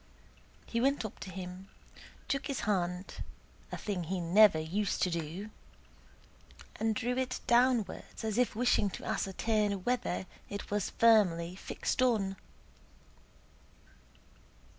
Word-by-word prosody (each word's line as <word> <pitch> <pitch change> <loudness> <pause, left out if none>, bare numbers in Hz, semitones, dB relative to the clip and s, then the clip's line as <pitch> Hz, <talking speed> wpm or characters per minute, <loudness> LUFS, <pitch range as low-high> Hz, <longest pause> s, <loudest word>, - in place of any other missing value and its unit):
He 230 - -1
went 275 -2 +2
up 215 - -7
to - - -7
him, 185 +1 -8 0.6
took 275 0 -1
his 275 - -2
hand 180 -2 -1 0.5
(a - - -3
thing 190 -5 -3
he 185 +3 -2
never 185 +2 +6
used 180 +6 -1
to 180 - +2
do), 170 +6 -4 1.3
and 220 0 +1
drew 245 +3 -1
it 255 -1 -1
downwards 240 -2 +2
as 220 +1 0
if 250 - +2
wishing 235 -3 +3
to - - -10
ascertain 205 0 0
whether 245 -4 -1 0.2
it 200 0 -6
was 205 -2 0
firmly 180 -7 +4
fixed 195 - -2
on. 210 -6 +2
205 Hz, 120 wpm, -32 LUFS, 185-230 Hz, 1.3 s, never